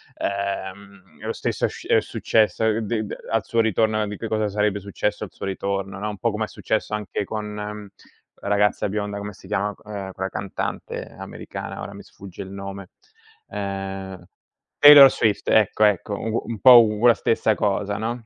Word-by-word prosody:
Ehm, 100 0 -5
e - - -9
lo - - -2
stesso - - -1
sc - - -10
è - - +4
successo, 110 0 +1
ehm, 110 0 +2
di 110 0 -2
d - - -9
uhm, - - -9
al 115 -1 +1
suo 115 - -1
ritorno, 110 0 +2
a 105 - -1
di 105 0 -6
che 115 - -5
cosa 110 -1 0
sarebbe 105 0 0
successo 100 +2 -3
al 105 - -7
suo - - -8
ritorno, 100 0 -3
no, 105 - -3
un 105 - -6
po' 115 +3 0
come 110 +1 -2
è - - -11
successo 110 0 -3
anche 105 -1 -3
con, 110 +1 -4
mhmm, 105 0 -6 0.6
la - - -5
ragazza 105 0 +2
bionda, 105 0 -3
come 100 0 -6
si 95 - -17
chiama, 100 +2 -1
c - - -27
uhm, 100 -2 -6
quella 95 +1 -4
cantante 95 +1 -5
americana, - - -7
ora - - -7
mi - - -10
sfugge 95 -3 -11
il 95 - -8
nome, 100 -1 -8 0.6
ehm 95 -2 -5 0.6
Taylor 145 -2 +11
Swift, 105 -3 0
ecco, 110 0 +3
ecco 105 0 +1
un 115 - -3
gu 115 - 0
un 115 -3 -5
po' 125 -1 +9
u 105 +1 -1
la 120 - +8
stessa 110 -1 +1
cosa, 100 0 -1
no? 115 +2 -4
105 Hz, 205 wpm, -23 LUFS, 100-110 Hz, 0.6 s, Taylor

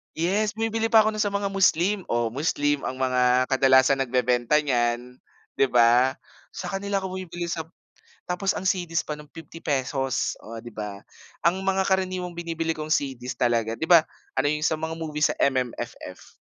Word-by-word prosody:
Yes, 200 +6 0
bumibili 225 0 0
pa 225 -1 +6
ako 220 - +1
no'n 215 - -6
sa 205 - -2
mga 200 -1 -1
Muslim, 195 0 +2
oh, 120 -1 0
Muslim 145 +1 0
ang 130 - -4
mga 125 -1 +2
kadalasan 130 0 +5
nagbebenta 125 0 +1
niyan, 125 -2 -1 0.4
'di 135 - +4
ba? 120 +2 +4 0.4
Sa - - -5
kanila 195 0 -2
ako 190 0 -5
bumibili 175 -1 -5
sa 165 -2 -3 0.6
tapos 180 +2 -1
ang - - -4
CD's 175 -3 0
pa 150 - -5
no'n 150 - -14
₱50 135 -5 -2
oh, 115 +1 -9
'di 120 - -10
ba? 105 -2 -6 0.4
Ang 175 +3 +3
mga 190 0 +1
karaniwang 185 -2 -1
binibili 165 -1 -3
kong 155 -1 -6
CD's 130 -3 -3
talaga 115 -2 +1
'di - - -3
ba, 170 0 +7 0.4
ano - - +2
yung 150 0 -1
sa 160 -1 +1
mga 160 0 -3
movie 155 -2 -5
sa - - +1
MMFF. 130 -3 -3
155 Hz, 170 wpm, -25 LUFS, 125-185 Hz, 0.6 s, ba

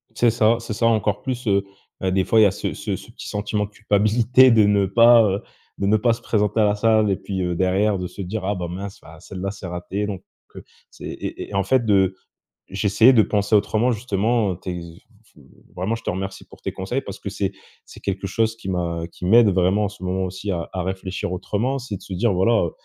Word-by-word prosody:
C'est 120 +1 +3
ça, 115 0 +3
c'est 115 -2 -6
ça 115 +2 0
encore 105 -2 +1
plus, 125 -2 -4
heu, 100 -1 +3 0.4
bah, 95 -1 -1
des 95 0 +2
fois 110 - +3
il - - +7
y - - +7
a 100 - +4
ce - - -4
ce - - -3
ce - - -11
petit - - -10
sentiment 105 0 -2
de - - -12
culpabilité 110 +5 +3
de 110 -2 +5
ne 100 -1 +3
pas, 115 +4 +6
heu 100 -1 0 0.4
de 100 - 0
ne 110 - +4
pas 115 +2 +2
se 115 - -8
présenter 105 -1 0
à 110 - +5
la 105 0 +2
salle. 110 0 +3
Et 95 - +2
puis, 95 0 -5
heu, 90 -1 -1
derrière 95 +3 +1
de 90 - -4
se 95 - -9
dire: 95 +2 -4
«Ah 100 - 0
ben 90 -2 -4
mince, 95 +3 -7
bah 80 - -14
heu - - -16
celle-là 95 +3 -5
c'est 100 -1 -9
raté». 90 +3 -4
Donc, 100 -3 -5 0.3
heu - - -9 0.3
c'est - - -11
et - - -6 0.2
et - - -11
et - - -11
en 100 - +2
fait 120 +5 +2
de 95 -3 +3 0.5
j'essayais 105 +5 +4
de 115 - +6
penser 105 0 0
autrement 110 +4 +2
justement. 110 -1 0
Heu, 85 - -8
t'es 90 - -5
v 85 -1 -9 0.8
vraiment 95 +6 -1
je 115 - -7
te - - -2
remercie 95 +1 -5
pour - - -17
tes - - -3
conseils 120 +8 -3
parce 100 - -8
que - - -5
c'est 100 -1 -2 0.3
c'est - - -14
quelque 100 0 -3
chose 110 +3 0
qui 105 - -9
m'a 85 -2 -2
qui 90 - -6
m'aide 110 +2 +6
vraiment 95 +3 +2
en - - 0
ce 100 -1 -14
moment, 95 +1 -1
aussi 95 +3 -5
à 85 -3 -3
à 95 - -2
réfléchir 95 -1 -4
autrement. 110 +9 -2
C'est 120 -5 -6
de - - -18
se 95 - -7
dire 100 +4 +1
voilà, 95 +3 +3
heu, 85 - -2
100 Hz, 250 wpm, -22 LUFS, 95-110 Hz, 0.8 s, il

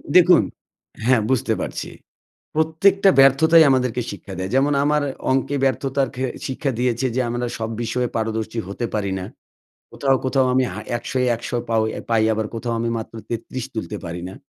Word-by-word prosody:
দেখুন, 180 -1 +7 0.6
হ্যাঁ, 125 -2 +4
বুঝতে 130 -3 +1
পারছি। - - -4 0.7
প্রত্যেকটা 175 +6 +3
ব্যর্থতাই 160 +5 +6
আমাদেরকে 125 -2 +1
শিক্ষা 100 - -9
দেয়। 95 +1 -3
যেমন 140 +2 +3
আমার 150 0 +2 0.3
অঙ্কে 135 +2 +1
ব্যর্থতার 135 0 0
ঘে 130 +1 -1 0.2
শিক্ষা 135 +2 -2
দিয়েছে 125 +1 +1
যে 130 - +1
আমরা 120 +1 -2
সব 110 0 -3
বিষয়ে 120 +2 -1
পারদর্শী 110 0 -2
হতে 110 +4 -3
পারি 100 -3 -1
না। 90 - -5 0.7
কোথাও, 135 -1 +2
কোথাও 130 0 +2
আমি 130 0 +3
হা 100 - -6 0.2
১০০ 120 - -7
ই, - - +2
১০০ 120 +1 -4
পাউ 115 -1 +2 0.3
পাই 110 -1 +3
আবার 110 0 -1
কোথাও 115 +1 -3
আমি 115 0 -1
মাত্র 110 - -8
৩৩ 120 +2 -4
তুলতে 110 -1 -4
পারি 85 +1 -5
না। 95 - -9
125 Hz, 170 wpm, -21 LUFS, 115-135 Hz, 0.7 s, দেখুন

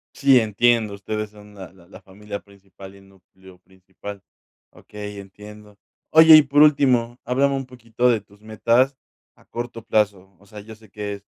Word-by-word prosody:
Sí, 135 -2 +4
entiendo, 110 0 +1
ustedes 105 +1 -5
son 105 0 -17
la 95 -3 -11
la 90 -2 -21
la - - -15
familia 100 +1 -9
principal 100 -1 -16
y 100 - -18
núcleo 95 -1 -20
principal. 95 +2 -13 0.5
Okey, 105 -1 -10
entiendo. 105 +1 -14 0.3
Oye, 160 0 +8
y 155 - +8
por 145 +1 +2
último, 125 -5 +2
háblame 140 +2 0
un 135 -1 -4
poquito 120 -1 -2
de 115 -3 +1
tus 100 0 -24
metas 120 +5 0 0.4
a - - -26
corto 120 -1 -8
plazo. 100 -3 -2
O 100 - -23
sea, 105 +1 -12
yo 110 +2 -13
sé 110 -1 -21
que 105 0 -6
es 100 0 -11
105 Hz, 175 wpm, -21 LUFS, 100-120 Hz, 0.5 s, Oye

